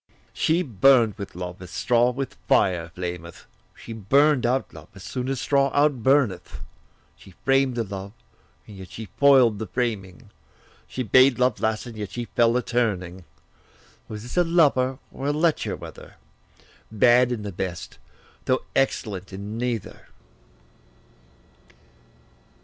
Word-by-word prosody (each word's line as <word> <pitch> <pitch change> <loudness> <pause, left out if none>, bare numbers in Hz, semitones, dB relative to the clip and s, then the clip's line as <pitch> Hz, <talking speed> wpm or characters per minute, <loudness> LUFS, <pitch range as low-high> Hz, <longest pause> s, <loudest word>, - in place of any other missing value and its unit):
She 170 +3 +1
burn'd 120 - +4
with 100 - -7
love, 90 0 -7
as 90 - -10
straw 120 +6 +2
with 130 +1 -4
fire 85 -3 +2
flameth; 85 -2 -7 0.3
She 115 - -9
burn'd 130 +5 +3
out 130 +2 -1
love, 80 -1 -12
as 100 - -12
soon 125 +4 -4
as 135 -2 -2
straw 140 0 +2
outburneth; 135 -8 +1 0.5
She 95 - -17
framed 135 -1 +2
the 115 - -1
love, 100 -1 -7 0.5
and 105 - -12
yet 95 -2 -10
she 110 -3 -9
foil'd 130 -7 +5
the 110 - -4
framing; 105 -1 -4 0.6
She 130 - -4
bade 130 +3 +5
love 125 0 +1
last, 110 +1 -1
and 120 -2 -9
yet 105 -2 -5
she 120 +5 -5
fell 115 +1 +2
a 125 - -1
turning. 95 -7 -2 0.8
Was 105 -1 -7
this 120 +8 -8
a 175 - +5
lover, 140 -7 +2
or 135 - -5
a - - +2
lecher 155 +2 0
whether? - - -12 0.8
Bad 120 +3 +4
in 115 -4 -3
the 100 - -5
best, 90 -2 -6 0.5
though 130 0 +1
excellent 100 -8 -1
in 100 +3 -7
neither. 120 -4 -4
120 Hz, 145 wpm, -24 LUFS, 95-130 Hz, 0.8 s, foil'd